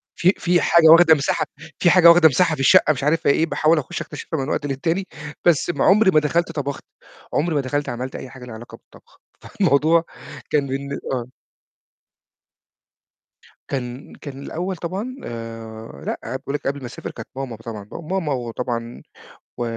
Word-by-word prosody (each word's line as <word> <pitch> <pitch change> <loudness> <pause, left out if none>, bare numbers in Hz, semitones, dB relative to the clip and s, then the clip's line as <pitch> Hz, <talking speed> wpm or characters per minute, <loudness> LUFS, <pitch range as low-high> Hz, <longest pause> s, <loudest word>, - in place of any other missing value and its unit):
في 185 +3 +3
في 175 0 +2
حاجة 170 -2 +5
واخدة 165 0 +8
مساحة 145 -1 0 0.3
في 175 - +4
حاجة 175 -1 +7
واخدة 170 -1 +8
مساحة 165 +4 +2
في 135 - -5
الشقة 155 +2 +5
مش 135 -1 -6
عارف 150 +2 +1
هي - - +7
إيه، 160 - +2
باحاول 160 0 +2
أخش 135 - -5
أكتشفها 155 +1 -5
من 135 +1 -3
وقت - - -1
للتاني، 165 +7 -2 0.4
بس 175 -1 +3
عمري 200 0 +5
ما 155 - +5
دخلت 165 +3 0
طبخت، 140 -3 -4 0.5
عمري 165 +1 0
ما 145 - +2
دخلت 145 +2 -2
عملت 125 +2 -5
أي 130 - -7
حاجة 125 0 -11
ليها 120 - -9
علاقة 120 +2 -11
بالطبخ. - - -22 0.2
فالموضوع 160 +4 +2 0.5
كان 145 -2 +1
بالن 140 +1 -4
آه. 125 -1 -4 2.4
كان 130 0 -5
كان 135 -2 -9
الأول 180 +6 -4
طبعًا 195 +10 -5
آآ 115 -7 -8
لأ. - - -3 0.2
باقول 140 +1 -5
لِك 145 - -4
قبل 140 +1 -2
ما 130 - -8
أسافر 120 - -7
كانت - - -9
ماما 135 -3 -5
طبعًا، 110 -2 -9
ماما 170 -2 -3
وطبعًا 120 -1 -4 0.6
و - - -2
145 Hz, 170 wpm, -21 LUFS, 125-170 Hz, 2.4 s, واخدة